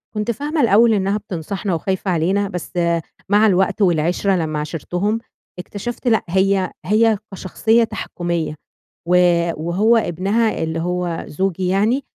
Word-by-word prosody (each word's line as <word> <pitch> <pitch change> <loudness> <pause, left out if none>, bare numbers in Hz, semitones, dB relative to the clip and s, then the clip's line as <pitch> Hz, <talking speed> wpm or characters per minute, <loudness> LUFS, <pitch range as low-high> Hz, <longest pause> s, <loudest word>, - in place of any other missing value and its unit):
كنت 210 +2 -1
فاهمة 290 +6 -2
الأول 225 +1 +5
إنها 200 +1 +1
بتنصحنا 195 -1 -4
وخايفة 190 +3 -2
علينا، 190 +5 +1
بس 180 0 -6
آآ 170 -1 +1 0.3
مع 210 +2 +5
الوقت 190 +2 +1
والعِشرة، 180 +2 +2
لمّا 155 -3 -2
عاشرتهم، 180 +8 -2 0.4
اكتشفت 230 +7 -6
لأ، 220 -2 +3
هي 190 0 +1
هي 215 +1 +3 0.2
كشخصية 220 +5 +1
تحكُّميَّة، 175 -7 -3 0.5
و 180 - +3 0.5
وهو 210 +7 +3
ابنها 205 +3 0
اللي 160 0 -2
هو 175 0 -2
زوجي 185 +2 -2
يعني، 215 +8 +1
190 Hz, 135 wpm, -19 LUFS, 175-215 Hz, 0.5 s, الأول